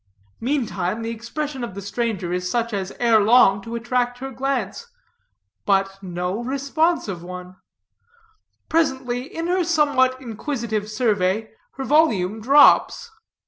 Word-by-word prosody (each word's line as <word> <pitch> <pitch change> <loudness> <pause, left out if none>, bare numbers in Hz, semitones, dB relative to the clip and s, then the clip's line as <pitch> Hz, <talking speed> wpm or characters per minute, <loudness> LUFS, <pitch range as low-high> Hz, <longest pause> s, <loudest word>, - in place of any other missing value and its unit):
Meantime, 230 -5 -2
the 230 - -3
expression 260 +4 -5
of 220 -6 -6
the - - -5
stranger 200 -3 -3
is 180 0 -2
such 235 0 -1
as 195 -2 -3
ere 230 -2 +4
long 205 -2 +5
to 230 +3 -7
attract 245 +1 -1
her 270 +1 -6
glance. 265 - -3 0.8
But 195 -1 0
no 180 +3 -3
responsive 275 - -1
one. 180 +1 -9 1.1
Presently, 265 -6 0
in 330 - -4
her 360 +1 +1
somewhat 285 -6 +2
inquisitive 230 -3 -4
survey, 215 -2 0 0.2
her 270 - -5
volume 225 - +2
drops. 290 - +5
235 Hz, 125 wpm, -22 LUFS, 200-270 Hz, 1.1 s, long